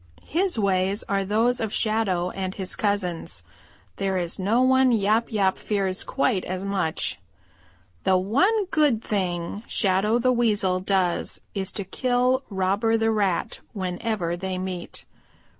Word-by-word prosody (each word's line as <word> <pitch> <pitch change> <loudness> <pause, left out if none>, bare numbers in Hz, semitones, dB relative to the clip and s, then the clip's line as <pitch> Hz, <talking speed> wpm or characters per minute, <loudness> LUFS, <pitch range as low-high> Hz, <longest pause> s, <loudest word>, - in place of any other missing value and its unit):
His 360 -1 0
ways 195 0 +1
are 200 -2 +1
those 225 +5 +1
of 220 -2 -2
Shadow 200 -6 0
and 190 -1 -4
his 190 -2 -2
cousins. 200 -5 -2 0.5
There 195 -1 0
is 175 0 -2
no 220 +7 +2
one 260 0 +4
Yap 220 +1 +2
Yap 195 -3 +1
fears 195 -2 -1
quite 245 -8 0
as 185 +1 -4
much. 190 -5 -1 0.8
"The 190 -1 +4
one 370 - +2
good 285 -8 +2
thing 180 -1 -2
Shadow 200 +2 +2
the 255 +1 +2
Weasel 205 -6 +2
does 185 -2 0
is 195 0 -2
to 200 - -4
kill 250 +5 +1
Robber 200 +3 +1
the 225 0 +2
Rat 200 -5 0
whenever 185 -2 -2
they 185 +1 -4
meet. 185 -1 -5
200 Hz, 140 wpm, -25 LUFS, 185-225 Hz, 0.8 s, one